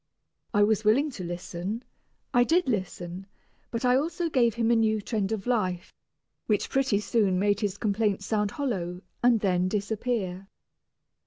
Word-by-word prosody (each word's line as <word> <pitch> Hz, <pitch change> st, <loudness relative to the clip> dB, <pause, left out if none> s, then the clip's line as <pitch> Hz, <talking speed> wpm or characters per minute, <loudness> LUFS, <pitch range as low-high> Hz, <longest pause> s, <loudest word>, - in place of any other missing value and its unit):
I 205 Hz, -, +4 dB
was 215 Hz, 0 st, +2 dB
willing 265 Hz, +8 st, +3 dB
to 200 Hz, -8 st, -7 dB
listen, 175 Hz, +5 st, -4 dB, 0.5 s
I 245 Hz, -1 st, +6 dB
did 335 Hz, +6 st, +2 dB
listen, 185 Hz, -4 st, -3 dB, 0.4 s
but 230 Hz, +1 st, -3 dB
I 250 Hz, 0 st, +5 dB
also 330 Hz, +3 st, -1 dB
gave 235 Hz, -5 st, +3 dB
him 230 Hz, 0 st, +2 dB
a -, -, +5 dB
new 220 Hz, -1 st, +2 dB
trend 210 Hz, -1 st, -2 dB
of 215 Hz, -3 st, -3 dB
life, 185 Hz, -8 st, -1 dB, 0.5 s
which 210 Hz, -2 st, 0 dB
pretty 265 Hz, -6 st, +2 dB
soon 210 Hz, -4 st, +1 dB
made 205 Hz, +2 st, +2 dB
his 205 Hz, -2 st, -2 dB
complaints 205 Hz, -2 st, 0 dB
sound 210 Hz, -1 st, 0 dB
hollow 190 Hz, -, -3 dB, 0.2 s
and 240 Hz, -3 st, +4 dB
then 180 Hz, -2 st, +2 dB
disappear. 205 Hz, -2 st, -2 dB
210 Hz, 155 wpm, -27 LUFS, 190-235 Hz, 0.5 s, I